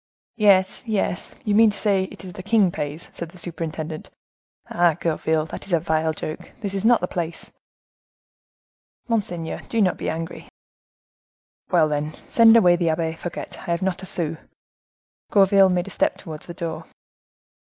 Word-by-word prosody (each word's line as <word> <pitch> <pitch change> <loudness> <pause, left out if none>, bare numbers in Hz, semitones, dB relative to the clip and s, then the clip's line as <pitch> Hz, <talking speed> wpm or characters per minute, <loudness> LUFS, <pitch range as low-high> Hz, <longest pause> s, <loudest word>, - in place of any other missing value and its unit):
"Yes, 195 -3 +4
yes, 205 -4 -2
you 210 - 0
mean 220 +1 +6
to 205 - -3
say 195 -3 +2
it 190 - -11
is 180 - -8
the 185 - -8
king 205 -2 +3
pays," 150 +1 -5
said 170 - -6
the 180 - -15
superintendent. 160 -2 -5 0.6
"Ah, 175 -2 +2
Gourville, 160 -1 0
that - - -7
is 190 - -4
a 170 - +4
vile 160 -1 0
joke; 155 0 -7
this 200 -2 -3
is 195 0 -2
not 235 -1 +5
the 180 - -1
place." 170 -2 -5 1.6
"Monseigneur, 180 -8 -2
do 230 - 0
not 190 -4 +2
be - - -3
angry." 165 +1 -5 1.2
"Well, 170 -4 +4
then, 150 +1 -2
send 230 0 +7
away 175 -5 +5
the 170 -2 +1
Abbe 160 0 0
Fouquet; 170 +1 -6
I 190 - -9
have 170 +2 0
not 190 -1 -1
a 190 - -5
sou." 165 -3 -1 0.9
Gourville 195 -2 +5
made 180 -1 0
a 195 - -8
step - - +1
towards 155 -3 -9
the 170 - -8
door. 160 -1 -5
175 Hz, 170 wpm, -23 LUFS, 160-195 Hz, 1.6 s, send